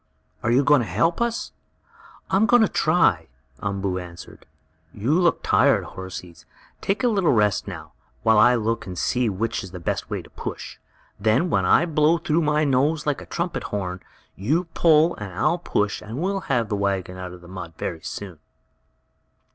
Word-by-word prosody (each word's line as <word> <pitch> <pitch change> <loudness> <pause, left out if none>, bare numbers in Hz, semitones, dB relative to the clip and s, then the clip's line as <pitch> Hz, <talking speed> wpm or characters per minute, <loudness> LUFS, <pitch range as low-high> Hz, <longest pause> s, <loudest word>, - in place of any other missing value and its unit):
"Are 110 - -1
you 125 +4 +4
going 145 -1 +5
to 115 - -4
help 125 - +1
us?" 235 0 -1 0.8
"I - - +3
am 210 +3 +4
going 245 +2 +6
to - - +4
try," 110 - +2 0.3
Umboo 100 -2 -2
answered. 85 -1 -11 0.5
"You 110 +7 -1
look 175 0 +2
tired, - - +3
horsies! 90 -2 -9 0.3
Take 200 +6 -1
a - - +4
little 195 -8 +2
rest 105 -3 +2
now, - - -8 0.3
while 110 -1 +5
I 125 +3 +6
look 115 -2 -1
and 90 -1 -6
see 125 +4 +1
which 115 +4 -2
is 95 - -8
the 90 0 -8
best 85 - -3
way - - -3
to - - -16
push. - - -7 0.4
Then, 110 - +2
when - - +2
I - - +5
blow 155 0 +3
through 165 0 0
my 150 0 +2
nose 145 +3 +1
like 145 -2 -1
a - - -11
trumpet 170 0 -3
horn, 95 -3 -4 0.3
you 145 - 0
pull 165 0 +4
and 100 -3 -6
I'll 155 - +1
push, 105 -10 -1
and 110 +3 -7
we'll 195 +3 -1
have 120 -5 +1
the 105 - 0
wagon 95 -2 -2
out 90 -1 -6
of 90 0 -12
the 85 - -14
mud 90 -2 -8
very 80 -3 -4
soon!" 90 -4 -7
115 Hz, 185 wpm, -23 LUFS, -, 0.8 s, going